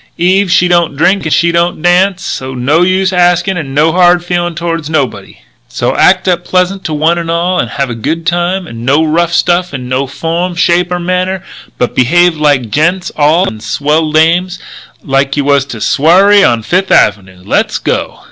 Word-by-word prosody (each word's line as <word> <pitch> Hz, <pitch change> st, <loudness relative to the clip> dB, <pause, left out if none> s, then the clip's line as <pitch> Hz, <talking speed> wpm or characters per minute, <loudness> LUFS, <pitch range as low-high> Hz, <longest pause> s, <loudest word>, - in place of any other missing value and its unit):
Eve, 185 Hz, +2 st, +1 dB
she 180 Hz, 0 st, +3 dB
don't 170 Hz, -4 st, +1 dB
drink 180 Hz, +5 st, +1 dB
and 160 Hz, -, -2 dB
she 170 Hz, +2 st, +2 dB
don't 170 Hz, -1 st, -1 dB
dance, 185 Hz, +2 st, +1 dB
so 130 Hz, 0 st, -5 dB
no 140 Hz, +7 st, +1 dB
use 185 Hz, +1 st, +1 dB
askin' 180 Hz, +1 st, +1 dB
and 140 Hz, -6 st, -6 dB
no 155 Hz, +3 st, +3 dB
hard 175 Hz, 0 st, +3 dB
feelin' 175 Hz, -1 st, -2 dB
toward 165 Hz, -2 st, -4 dB
nobody. 140 Hz, -7 st, -3 dB, 0.3 s
"So -, -, -2 dB
act -, -, +2 dB
up 175 Hz, -1 st, 0 dB
pleasant 185 Hz, +2 st, -1 dB
to 155 Hz, -, -3 dB
one 160 Hz, +3 st, +1 dB
and 165 Hz, -1 st, -5 dB
all 175 Hz, +2 st, -1 dB
and -, -, -1 dB
have 135 Hz, -3 st, -3 dB
a -, -, -3 dB
good 160 Hz, +9 st, -4 dB
time 175 Hz, +2 st, -1 dB
and 115 Hz, -7 st, -9 dB
no 140 Hz, +5 st, +2 dB
rough 165 Hz, +2 st, 0 dB
stuff 175 Hz, -1 st, 0 dB
in 125 Hz, -2 st, -7 dB
no 130 Hz, +2 st, -2 dB
form, 165 Hz, +6 st, -3 dB
shape 175 Hz, +1 st, +1 dB
or 180 Hz, -, -1 dB
manner, 185 Hz, +1 st, -2 dB, 0.3 s
but 125 Hz, -, -2 dB
behave 175 Hz, +7 st, +2 dB
like 145 Hz, -7 st, 0 dB
gents 175 Hz, -, 0 dB
all 155 Hz, +5 st, +2 dB
and 110 Hz, -1 st, -7 dB
swell 150 Hz, +8 st, -1 dB
dames, 170 Hz, +4 st, +1 dB, 0.5 s
like 135 Hz, 0 st, -1 dB
you 145 Hz, -, +1 dB
was 140 Hz, -2 st, +2 dB
to 120 Hz, -, -7 dB
a -, -, -11 dB
swarry 195 Hz, +7 st, +4 dB
on 115 Hz, -2 st, +1 dB
Fifth 185 Hz, -, -1 dB
Avenue. 95 Hz, -3 st, +1 dB
Let's -, -, 0 dB
go!" -, -, -3 dB
170 Hz, 195 wpm, -11 LUFS, 145-180 Hz, 0.5 s, swarry